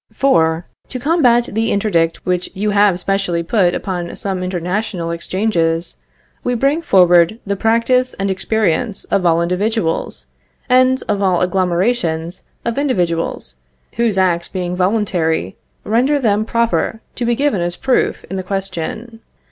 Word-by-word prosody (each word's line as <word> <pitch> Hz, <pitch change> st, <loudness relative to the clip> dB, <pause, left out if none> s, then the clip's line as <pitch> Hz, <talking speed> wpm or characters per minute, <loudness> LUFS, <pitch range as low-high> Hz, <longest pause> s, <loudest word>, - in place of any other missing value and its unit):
For 165 Hz, -11 st, +2 dB, 0.2 s
to 255 Hz, -, -5 dB
combat 250 Hz, -5 st, +3 dB
the 225 Hz, +2 st, 0 dB
interdict 170 Hz, -6 st, 0 dB
which 180 Hz, -1 st, -1 dB
you 210 Hz, +2 st, -1 dB
have 200 Hz, -3 st, +3 dB
specially 190 Hz, -3 st, -1 dB
put 180 Hz, -1 st, +2 dB
upon 175 Hz, -3 st, -4 dB
some 190 Hz, -2 st, -3 dB
international 180 Hz, 0 st, -2 dB
exchanges, 170 Hz, -1 st, -1 dB, 0.5 s
we 245 Hz, -, 0 dB
bring 275 Hz, +7 st, +1 dB
forward 180 Hz, -, +4 dB
the 200 Hz, 0 st, -1 dB
practice 230 Hz, +4 st, +1 dB
and 195 Hz, 0 st, -1 dB
experience 210 Hz, +1 st, -1 dB
of 180 Hz, -3 st, 0 dB
all 170 Hz, 0 st, +3 dB
individuals, 180 Hz, 0 st, -1 dB, 0.4 s
and 255 Hz, +1 st, +3 dB
of 205 Hz, -2 st, 0 dB
all 185 Hz, -3 st, +2 dB
agglomerations 180 Hz, -2 st, 0 dB, 0.2 s
of 235 Hz, +3 st, -1 dB
individuals, 170 Hz, -, -1 dB, 0.4 s
whose 230 Hz, -4 st, +1 dB
acts 175 Hz, -2 st, +1 dB
being 180 Hz, -2 st, -3 dB
voluntary, 180 Hz, -, 0 dB, 0.3 s
render 250 Hz, +7 st, +2 dB
them 215 Hz, -5 st, +1 dB
proper 230 Hz, -1 st, 0 dB
to 245 Hz, -, -4 dB
be 240 Hz, 0 st, +1 dB
given 275 Hz, -8 st, 0 dB
as 175 Hz, 0 st, -1 dB
proof 265 Hz, +4 st, 0 dB
in 190 Hz, -, -5 dB
the -, -, -2 dB
question. 195 Hz, +4 st, -4 dB
195 Hz, 140 wpm, -17 LUFS, 175-230 Hz, 0.5 s, forward